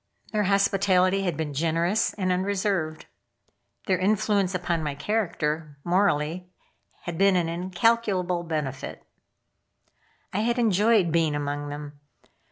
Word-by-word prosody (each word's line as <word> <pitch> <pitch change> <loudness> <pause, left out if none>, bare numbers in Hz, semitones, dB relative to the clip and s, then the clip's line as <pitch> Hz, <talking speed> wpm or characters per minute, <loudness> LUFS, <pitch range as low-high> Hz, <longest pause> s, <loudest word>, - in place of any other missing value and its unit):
Their 210 -1 +1
hospitality 195 -1 +2
had 175 -5 -1
been 155 -2 -3
generous 165 +7 0
and 185 -3 -1
unreserved. 185 -4 -1 0.8
Their 185 -3 +1
influence 200 -1 +1
upon 175 -2 -1
my 145 -2 -3
character 155 -6 -2
morally 180 -1 +1 0.5
had 175 -2 -6
been 195 -1 +5
an 175 -2 +1
incalculable 180 +1 0
benefit. 150 -6 -4 1.3
I 195 - 0
had 235 +3 0
enjoyed 215 -4 +3
being 160 -2 +2
among 145 0 -3
them. 145 0 -8
180 Hz, 115 wpm, -26 LUFS, 155-200 Hz, 1.3 s, been